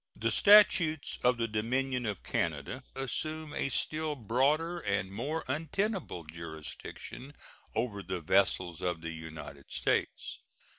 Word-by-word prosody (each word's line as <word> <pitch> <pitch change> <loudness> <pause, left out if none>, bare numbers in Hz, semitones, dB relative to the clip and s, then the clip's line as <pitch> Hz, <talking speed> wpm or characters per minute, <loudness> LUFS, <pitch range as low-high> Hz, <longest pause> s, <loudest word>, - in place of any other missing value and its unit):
The 115 +1 0
statutes 180 - +6
of 125 0 +4
the 115 0 0
Dominion 125 +3 0
of 105 -3 -3
Canada 85 - -2
assume 155 +4 -2
a 135 - -1
still 155 +3 0
broader 145 - +1
and 100 - -1
more 140 +10 -3
untenable 180 - -1
jurisdiction 85 - -8 0.4
over 110 -3 -1
the 95 -1 -3
vessels 90 0 +2
of 90 -3 -1
the 85 0 -4
United 80 -3 -9
States. - - 0
120 Hz, 120 wpm, -31 LUFS, -, 0.4 s, statutes